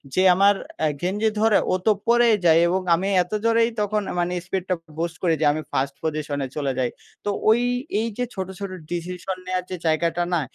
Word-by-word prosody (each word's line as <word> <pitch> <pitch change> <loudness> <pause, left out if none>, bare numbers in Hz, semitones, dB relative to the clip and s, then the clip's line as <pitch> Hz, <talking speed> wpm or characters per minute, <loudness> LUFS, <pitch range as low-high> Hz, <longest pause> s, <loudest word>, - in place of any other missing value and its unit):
যে 185 - +4
আমার 200 +2 +5 0.3
আ - - +4
গেঞ্জি 205 +5 +1
ধরে 220 -2 +5 0.2
ও - - +4
তো 220 - +6 0.2
পড়েই 235 -1 +5
যায় 165 -1 +6
এবং 185 +2 +1
আমি 185 +4 -2 0.2
এত 180 - -19
জোরেই 230 0 +4
তখন 210 +1 0 0.2
মানে 175 +1 0
স্পিডটা 185 0 -2 0.2
বুস্ট 170 -1 -2
করি 170 -2 +3
যে - - +3
আমি 155 - -3
1st 140 +1 -1
পজিশনে 150 -3 -2
চলে 140 -3 -1
যাই। 125 -1 +1 0.4
তো - - 0 0.2
ওই 225 +2 +5 0.4
এইযে 230 +2 -2
ছোটো, 190 -1 -4
ছোটো 195 -2 -5 0.2
ডিসিশন 180 +2 -4
নেওয়ার 185 0 -1
যে - - -1
জায়গাটা 165 +2 +1
না, 170 - +2
185 Hz, 195 wpm, -23 LUFS, 165-205 Hz, 0.4 s, তো